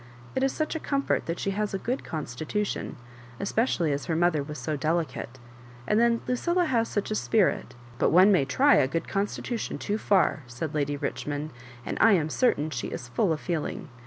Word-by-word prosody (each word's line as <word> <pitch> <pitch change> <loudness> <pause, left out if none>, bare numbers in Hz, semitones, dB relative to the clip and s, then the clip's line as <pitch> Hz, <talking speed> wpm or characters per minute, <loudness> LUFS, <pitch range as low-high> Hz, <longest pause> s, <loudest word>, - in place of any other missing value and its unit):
" 120 0 -19
It 260 - +1
is 270 0 +2
such 310 +3 -2
a - - -1
comfort 280 -2 0
that 170 +1 -2
she 195 - -1
has 205 0 -2
a - - +1
good 245 +7 -3
constitution, 155 - -3 0.4
especially 200 - +1
as 140 0 -2
her 165 - -1
mother 170 -2 +2
was 150 +1 -6
so 135 +5 -2
delicate; 150 -4 -2 0.5
and 210 - +2
then 235 0 +3
Lucilla 345 +8 +1
has 235 -6 +1
such 205 0 -2
a - - +2
gpirit 215 -2 +2
*^ - - -19 0.2
" 120 0 -20
But - - +3
one 185 +4 +6
may 175 -9 +4
try 270 - +4
a 130 - +4
good 165 +5 -2
constitution 205 +4 -2
too 210 +1 -2
&r," 185 -6 +4
said 125 +6 -5
Lady 145 -1 0
Richmond; 145 +2 -3 0.2
" 120 -1 -18
and - - -3
I 225 - +7
am 160 -5 +2
certain 155 - +1
she 120 -4 -3
is 120 - -6
full 175 - +1
of 155 - 0
feeling. 160 -3 -3
170 Hz, 215 wpm, -27 LUFS, 145-220 Hz, 0.5 s, I